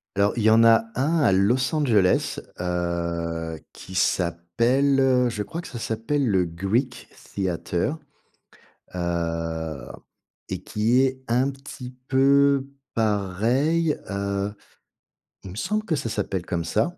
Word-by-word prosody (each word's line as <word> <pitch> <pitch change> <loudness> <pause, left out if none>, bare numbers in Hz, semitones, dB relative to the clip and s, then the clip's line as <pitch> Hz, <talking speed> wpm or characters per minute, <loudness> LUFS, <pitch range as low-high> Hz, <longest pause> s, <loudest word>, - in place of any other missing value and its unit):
Alors, 100 +1 +2
il 115 - 0
y 110 - +5
en 115 +1 +6
a 115 -1 +6
1 155 +6 +1
à - - +4
Los 110 - +2
Angeles, 115 -12 +2 0.2
heu, 85 -2 -2
qui 95 - -11
s’appelle 125 +11 +2
je 105 -3 -4
crois 160 +11 -5
que - - -10
ça 120 - -7
s'appelle 115 +6 -1
le 95 -4 +2
Greek 105 +9 -2 0.3
Theater. 95 - -1 1.0
Heu, 85 -3 -3 0.6
et - - -4
qui 115 +4 +2
est 130 0 0
un 125 +4 +2
petit 135 -2 -10
peu 140 +1 +4 0.3
pareil. 115 - +1
Heu, 100 0 -2 0.9
il 95 - -8
me - - -9
semble 210 - -1
que 165 - 0
ça 120 - -3
s'appelle 95 -4 -3
comme 85 -2 -2
ça. 115 - 0
110 Hz, 130 wpm, -24 LUFS, 90-130 Hz, 1.0 s, en